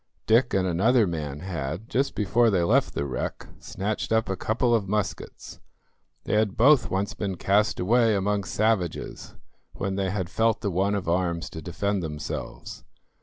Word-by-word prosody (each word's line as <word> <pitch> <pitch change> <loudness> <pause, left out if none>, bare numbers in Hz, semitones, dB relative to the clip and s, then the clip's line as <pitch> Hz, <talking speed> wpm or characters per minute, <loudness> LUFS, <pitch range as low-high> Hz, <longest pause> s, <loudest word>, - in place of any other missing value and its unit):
Dick 120 +3 +3
and 95 -1 +2
another 110 +7 +3
man 75 -5 -4
had, 85 +2 -4
just 135 +3 -1
before 115 +3 +3
they 95 -5 +2
left 85 - +2
the 70 - -1
wreck, 65 -3 -4
snatched 105 +4 -4
up 110 -3 +2
a 95 - 0
couple 120 +5 0
of 110 -4 +1
muskets. 105 0 -4 0.6
They - - -3
had 105 -2 +1
both 135 +4 +5
once 95 +2 -1
been 100 -2 -3
cast 105 +4 +2
away 115 +3 +3
among 100 0 0
savages 110 -6 -1 0.4
when 95 -1 -3
they 95 -1 0
had 95 -2 -2
felt 110 +4 +1
the 100 -3 -1
want 95 +3 +1
of 100 -4 -3
arms 85 -1 -1
to 80 - -7
defend 100 +4 -2
themselves. 75 -3 -6
100 Hz, 170 wpm, -26 LUFS, 90-110 Hz, 0.6 s, both